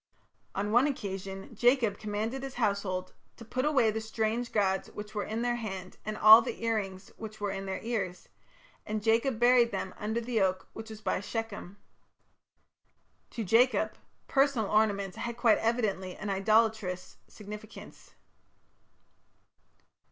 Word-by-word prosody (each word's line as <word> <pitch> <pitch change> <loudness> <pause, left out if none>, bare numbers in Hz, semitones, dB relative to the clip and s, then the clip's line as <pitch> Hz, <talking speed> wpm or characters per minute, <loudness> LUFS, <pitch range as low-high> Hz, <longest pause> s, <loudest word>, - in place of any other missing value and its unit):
On 205 +2 -1
one 245 +5 +5
occasion 195 -6 -5
Jacob 240 -1 +2
commanded 215 +5 -3
his 270 -1 -7
household 200 -5 -1 0.2
to 230 - -11
"put 255 +4 -2
away 270 -7 +3
the 220 +1 -3
strange 220 +2 -2
gods 190 -3 +1
which 210 0 -8
were 205 -2 -2
in 225 +2 -3
their 240 0 0
hand, 190 -5 -6
and 215 0 -4
all 215 +2 +10
the 230 -1 -5
ear 225 -1 +2
rings 190 -2 -5
which 215 -1 -8
were 205 -1 -2
in 195 0 -5
their 190 - -3
ears; 200 -6 -3 0.6
and 215 -1 -4
Jacob 230 +2 +2
buried 240 -1 +5
them 190 - -4
under 220 +2 -1
the 235 -2 -1
oak 185 0 0
which 225 0 -8
was 215 -1 -9
by - - 0
Shechem". 205 -2 -5 1.5
To 230 - -4
Jacob, 225 +1 +3 0.3
personal 270 -6 +2
ornaments 205 -2 +1
had 235 +1 -4
quite 235 -2 +4
evidently 210 -6 -1
an 210 -1 -4
idolatrous 215 -2 +1
significance. 210 +1 -11
215 Hz, 145 wpm, -30 LUFS, 200-230 Hz, 1.5 s, all